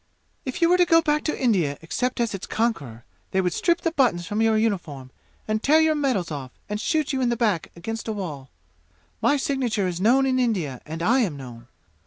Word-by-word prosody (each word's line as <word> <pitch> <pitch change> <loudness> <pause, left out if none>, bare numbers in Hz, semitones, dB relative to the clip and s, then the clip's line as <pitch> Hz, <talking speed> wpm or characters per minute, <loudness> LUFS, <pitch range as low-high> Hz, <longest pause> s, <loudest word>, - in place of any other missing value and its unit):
"If 260 +5 -2
you 335 - +5
were 360 +1 +4
to 355 - +6
go 330 0 +6
back 300 -1 +1
to 305 - -1
India 180 - +1
except 250 +10 -2
as 235 -3 0
its 195 - -6
conqueror, 145 - -2 0.2
they 190 - 0
would 180 -2 +1
strip 340 0 +1
the 330 - 0
buttons 245 - +1
from 210 +5 -2
your 225 -1 +3
uniform 165 - -2 0.4
and 215 0 0
tear 305 +5 +5
your 315 0 +4
medals 260 - 0
off 140 -3 -5 0.2
and 210 0 -3
shoot 305 +1 0
you 265 - 0
in 245 - +2
the 235 - 0
back 210 -8 0
against 225 +8 -5
a - - -1
wall! 155 -11 -6 0.7
My 290 - +3
signature 250 -8 0
is 180 0 -3
known 255 +6 +4
in 260 -1 +1
India 180 - -1
and 160 +2 -5
I 235 +8 +4
am 185 - 0
known. 120 -3 -10
220 Hz, 220 wpm, -24 LUFS, 170-265 Hz, 0.7 s, to